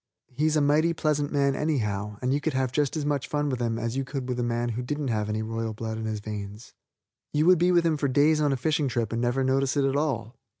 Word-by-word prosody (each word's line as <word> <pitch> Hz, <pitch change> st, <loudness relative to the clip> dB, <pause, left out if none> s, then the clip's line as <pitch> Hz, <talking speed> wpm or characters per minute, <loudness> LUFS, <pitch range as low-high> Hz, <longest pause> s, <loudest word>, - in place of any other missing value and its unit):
He 150 Hz, +5 st, +1 dB
is 155 Hz, -, +1 dB
a 155 Hz, -, +3 dB
mighty 155 Hz, +4 st, +3 dB
pleasant 150 Hz, -2 st, 0 dB
man, 140 Hz, -2 st, +2 dB
anyhow, 105 Hz, -9 st, -1 dB
and 125 Hz, +1 st, +1 dB
you 145 Hz, -, 0 dB
can 160 Hz, 0 st, -1 dB
have 130 Hz, -1 st, 0 dB
just 145 Hz, +2 st, 0 dB
as 150 Hz, -, -2 dB
much 145 Hz, -2 st, -1 dB
fun 145 Hz, 0 st, -1 dB
with 130 Hz, -3 st, -2 dB
him 115 Hz, -1 st, 0 dB
as 115 Hz, +1 st, -3 dB
you 135 Hz, -, 0 dB
could 130 Hz, -1 st, -5 dB
with 125 Hz, -1 st, -2 dB
a -, -, 0 dB
man 120 Hz, 0 st, -1 dB
who 120 Hz, +1 st, -3 dB
didn't 145 Hz, +2 st, -3 dB
have 105 Hz, -2 st, -1 dB
any 110 Hz, +1 st, -1 dB
royal 115 Hz, 0 st, -3 dB
blood 110 Hz, 0 st, -4 dB
in 110 Hz, -, -4 dB
his 110 Hz, -1 st, -3 dB
veins. 105 Hz, +1 st, -7 dB, 0.6 s
You 150 Hz, +1 st, +2 dB
would 180 Hz, -1 st, +6 dB
be 175 Hz, +1 st, +3 dB
with 175 Hz, -1 st, +3 dB
him 160 Hz, -2 st, +2 dB
for 145 Hz, -, 0 dB
days 150 Hz, +4 st, +3 dB
on 145 Hz, -1 st, +2 dB
a 135 Hz, -, 0 dB
fishing 150 Hz, +2 st, 0 dB
trip 115 Hz, -3 st, -1 dB
and 115 Hz, -, -1 dB
never 125 Hz, +2 st, +1 dB
notice 135 Hz, +1 st, +1 dB
it 140 Hz, -, +3 dB
at 135 Hz, 0 st, 0 dB
all. 130 Hz, -5 st, -1 dB
135 Hz, 275 wpm, -26 LUFS, 115-150 Hz, 0.6 s, would